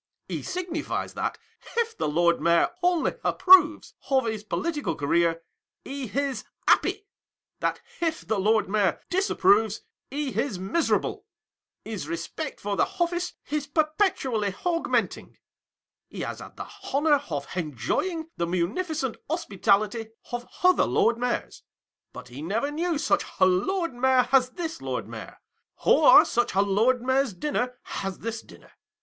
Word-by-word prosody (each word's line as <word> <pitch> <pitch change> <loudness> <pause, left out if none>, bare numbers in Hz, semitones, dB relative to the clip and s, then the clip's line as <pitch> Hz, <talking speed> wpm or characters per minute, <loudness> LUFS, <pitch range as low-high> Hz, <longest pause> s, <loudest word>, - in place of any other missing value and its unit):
He - - -4
signifies 345 -4 -3
that, - - -2 0.4
if 460 -1 +1
the - - -1
Lord 170 +2 +2
Mayor 170 0 +3
only 355 -2 +2
approves 375 0 +5 0.2
of 265 -2 +3
his 220 -2 -3
political 300 +7 -2
career, 165 +3 +1 0.4
he 275 0 -5
is 275 +4 -2 0.2
happy; 405 +1 +3 0.5
that - - -1 0.2
if 325 -2 -1
the 220 -2 0
Lord 215 +3 +2
Mayor 200 -2 +1
disapproves, 365 - +3 0.3
he 285 +1 -2
is 250 -5 -2
miserable. 195 - -1 0.6
His 210 -9 -5
respect 165 +1 -5
for 205 0 -2
the - - +2
office 345 +1 0 0.2
is 300 -1 -1
perpetually 305 - +1
aug 335 - -2
menting. - - -1 0.7
He - - -7
has - - -4
had - - -11
the - - -6 0.2
honour 290 0 +3
of 140 -1 -3
enjoying 185 - -2
the 170 - -1
munificent 255 - -1
hospitality 215 - +1 0.2
of 240 0 -4 0.2
other 365 0 +5
Lord 230 0 +2
Mayors, 245 0 -2 0.5
but - - -10
he 125 +4 -9
never 220 - -1
knew 335 +1 -1
such 300 - +1 0.2
a - - +7
Lord 300 - +1
Mayor 255 +1 +3
as 260 -2 +5
this 330 -2 -5
Lord - - -3
Mayor, - - -9 0.5
or - - +7
such 240 -5 0
a 195 - +5
Lord 225 +5 +2
Mayor's 260 -4 +1
dinner 250 +2 -2 0.2
as 195 -1 -4
this 230 0 -5
dinner. - - -17
250 Hz, 145 wpm, -26 LUFS, 200-325 Hz, 0.7 s, a